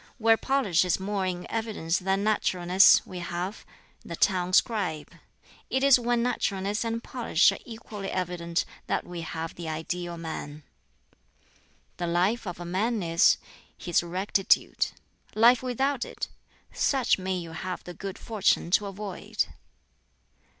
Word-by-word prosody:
Where 225 -1 +5
polish 225 -9 +2
is 180 0 +1
more 195 0 -1
in 180 -1 -4
evidence 215 -7 -1
than 195 +2 0
naturalness, 190 -3 +4
we 185 -2 -7
have 175 +3 -4 0.4
the 170 - -6
town 180 0 +1
scribe. 185 -8 +1 0.6
It 265 +1 0
is 275 -2 +7
when 240 0 +1
naturalness 200 -3 -1
and 230 0 -3
polish 230 -9 +3
are - - -6
equally 215 -4 -7
evident 175 -2 -2 0.2
that - - -1
we 175 -1 -6
have 165 0 -5
the 170 -2 -6
ideal 170 +2 -4
man. 155 -2 -6 1.3
"The 175 - -2
life 190 +7 +1
of 175 -1 -5
a 175 - -6
man 205 +4 0
is 165 0 +4 0.4
his 175 - +1
rectitude. 185 +3 +1 0.5
Life 235 +2 +6
without 255 +1 0
it - - -5 0.4
such 265 -7 +2
may 185 0 -2
you 170 -2 -6
have 180 +3 -5
the 180 - -8
good 195 +4 -6
fortune 210 -6 +1
to 205 +2 +3
avoid! 200 -1 -3
190 Hz, 140 wpm, -27 LUFS, 175-225 Hz, 1.3 s, is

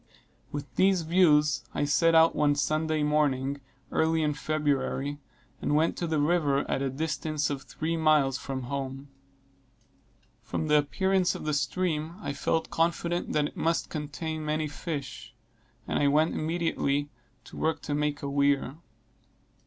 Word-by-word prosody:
With 145 -1 -4
these 190 -2 +4
views, 155 -3 +3
I - - +1
set 165 +3 +3
out 160 0 +6
one 145 -1 +3
Sunday 155 +2 0
morning, 140 -2 +1 0.3
early 160 0 +2
in 150 -1 +1
February, 145 -1 -1 0.4
and 150 - +1
went 160 +2 +2
to 170 - -2
the 160 -1 0
river 145 -3 +2
at - - -1
a 135 - 0
distance 155 +1 -2
of 140 -1 -3
three 160 +4 -3
miles 155 -4 +3
from 130 -2 -5
home. 135 +1 -5 1.3
From 155 - -3
the 150 0 +6
appearance 190 +5 +1
of - - -7
the 155 - 0
stream 155 +4 -1
I 140 - -4
felt 160 +3 -1
confident 170 +1 0
that 150 -1 +2
it - - -21
must 165 0 0
contain 155 +1 -4
many 155 0 -1
fish; 145 -2 -6 0.5
and - - 0
I 145 - +3
went 155 +3 +3
immediately 155 -3 -1 0.3
to 130 - -13
work 160 -1 -1
to 145 - -3
make 150 -1 -1
a - - -2
weir. 140 0 +1
150 Hz, 155 wpm, -28 LUFS, 140-160 Hz, 1.3 s, out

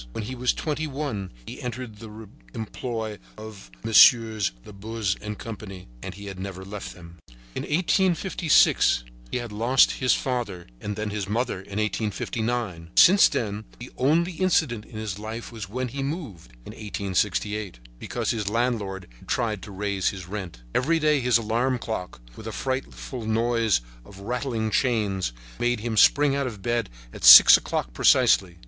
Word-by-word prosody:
When 110 - -4
he 120 +5 -6
was 125 0 +1
twenty 155 0 -3
one 135 -10 -4
he - - -9
entered 125 -3 -6
the 110 0 -11 0.3
employ 110 -1 -5 0.2
of 110 - -11
Messieurs 110 - +5
Labuze 105 0 -3
and 105 0 -6
Company. 100 - -9
And - - -7
he 100 +1 -10
had 95 -2 -8
never 95 -1 -7
left 100 +1 -7
them. 85 -1 -14 0.3
In - - -4
1856 175 - +2 0.3
he - - -2
had 120 -2 -6
lost 120 +5 +3
his 130 - +1
father 115 -9 -3
and 105 0 -5
then 110 0 -4
his 100 -2 -4
mother 115 0 -1
in 100 +2 -8
1859. 110 -3 -2
Since 195 +3 +7
then 105 -1 -3
the 120 - -10
only 160 +7 +2
incident 160 - 0
in 110 - -11
his 105 -2 -5
life 110 +2 -7
was 110 -5 -8
when 125 +3 -3
he 135 +3 -5
moved, 135 - -6
in - - -8
1868, 105 - -2 0.2
because - - -2
his 105 -3 -2
landlord 105 -5 -2
had - - -18
tried 110 -4 -1
to 105 - -10
raise 100 -1 -1
his 95 -3 -8
rent. 90 -11 -7
Every 160 +6 +2
day 150 -2 +2
his 125 -2 +3
alarm 115 +3 0
clock, 110 - -5 0.2
with 110 - -10
a - - -4
frightful 130 -1 -4
noise 115 - +1 0.2
of 95 +10 -14
rattling 115 -1 -2
chains, 105 - 0 0.3
made 120 -2 0
him 115 -1 -3
spring 140 +6 +5
out 140 -1 -1
of 105 -6 -8
bed 120 -2 -1 0.2
at - - -10
6 - - +11
o'clock - - -4
precisely. 90 +7 +3
110 Hz, 165 wpm, -25 LUFS, 100-125 Hz, 0.3 s, 6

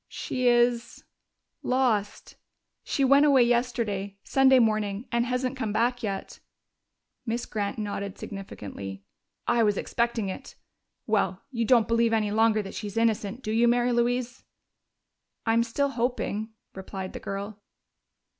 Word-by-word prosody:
"She 255 -1 -2
is 240 -1 +2 0.6
lost. 235 -6 0 0.5
She 275 - 0
went 280 +2 +6
away 270 -4 +6
yesterday 235 -5 -1
Sunday 265 -1 +5
morning 215 -1 +1
and 235 0 +1
hasn't 250 +1 -1
come 225 -5 -2
back 240 +3 +1
yet." 195 -4 -4 0.8
Miss 235 0 -2
Grant 205 0 -3
nodded 200 -2 -4
significantly. 100 - -8 0.4
"I 240 -1 +2
was 210 -3 +2
expecting 235 -3 -1
it. 190 - -7 0.5
Well, 205 -3 0
you 230 -3 -1
don't 235 -2 +4
believe 230 0 +2
any 215 -2 +1
longer 220 0 +3
that 195 - -8
she's 205 0 -6
innocent, 225 +1 0
do 215 - -3
you, 230 +2 +3
Mary 240 +1 +3
Louise?" 245 +1 0 1.0
"I'm 225 0 +3
still 260 +5 0
hoping," 235 -4 -2 0.2
replied 190 0 -7
the - - -6
girl. 200 +1 -6
230 Hz, 135 wpm, -27 LUFS, 205-245 Hz, 1.0 s, went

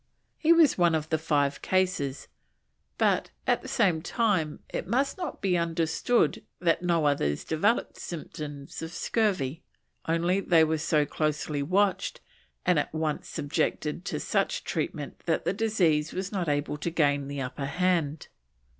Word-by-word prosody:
He 320 - +4
was 330 - +5
one 170 -2 +4
of 155 0 -2
the 160 - +1
five 145 -3 +1
cases, 185 -8 0 0.7
but, - - +2 0.2
at - - +2
the - - -9
same 185 -9 +2
time, 185 -7 0
it - - -4
must 265 +7 +1
not 355 -5 -5
be 185 -2 +2
understood 170 +7 +1 0.2
that 170 -2 +2
no 170 -3 +1
others 75 - +1
developed 200 +9 0
symptoms 150 -4 -7
of 165 0 -5
scurvy, 170 - 0 0.5
only 170 +3 +2
they 170 -4 +4
were 160 0 +1
so 150 -1 +2
closely 150 0 -1
watched 190 +6 +1 0.5
and 180 -4 +4
at - - -2
once 155 -1 -2
subjected 150 +2 -2
to - - -2
such - - 0
treatment - - -3
that - - +1
the - - +1
disease 170 -9 +1
was 190 +1 -3
not 185 -6 -1
able 145 0 -1
to 160 - -2
gain 145 -4 +1
the 140 0 -5
upper 135 +2 -4
hand. 165 -2 0
160 Hz, 155 wpm, -28 LUFS, 150-185 Hz, 0.7 s, was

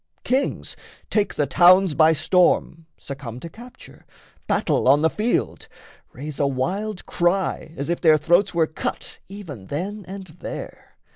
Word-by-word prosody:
Kings 265 +3 -1 0.4
take 210 -2 0
the 145 - +1
towns 180 +4 +5
by 155 +1 +5
storm, 165 0 +1
Succumb 135 -4 -8
to 170 - -7
capture, 240 +7 -14 0.4
battle - - +1
on 145 +3 +5
the 160 - +3
field, 225 +3 -1 0.4
Raise 145 +2 -8
a 140 - +2
wild 180 +10 -3
cry 175 -2 -1
as 140 - -4
if 170 +1 -2
their 155 -3 +6
throats 175 +5 +2
were 170 -2 +2
cut 155 - -5
Even 165 - -9
then 195 +8 -4
and 190 0 -8
there. - - -8
170 Hz, 145 wpm, -22 LUFS, 145-195 Hz, 0.4 s, their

